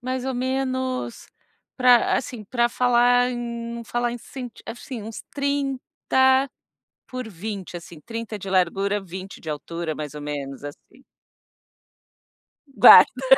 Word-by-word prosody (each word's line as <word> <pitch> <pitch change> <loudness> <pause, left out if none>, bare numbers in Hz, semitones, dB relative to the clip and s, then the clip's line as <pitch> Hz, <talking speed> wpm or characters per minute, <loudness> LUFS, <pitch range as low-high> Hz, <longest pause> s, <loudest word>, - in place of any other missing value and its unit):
mais 255 0 -3
ou 265 - -1
menos, 260 -1 -2 0.5
pra 250 -2 +5
assim, 240 -4 -5
pra 240 +3 +1
falar 245 0 +3
em 245 - -4 0.4
num 235 0 -7
falar 240 +1 -1
em 240 - -6
cent 245 -1 -9
assim 240 -1 -7
uns 220 +1 -8
30 275 -1 +1 0.6
por 255 -3 -6
20, 195 -1 -6
assim, 170 -1 -13
30 230 +1 -6
de 195 - -8
largura 195 +2 +1
20 190 +1 -9
de 160 - -9
altura, 160 +2 -4
mais 150 -1 -6
ou 150 - -7
menos 140 -2 -5
assim. 145 - -11 1.7
Guarda. 230 +2 +8
235 Hz, 130 wpm, -23 LUFS, 190-255 Hz, 1.7 s, Guarda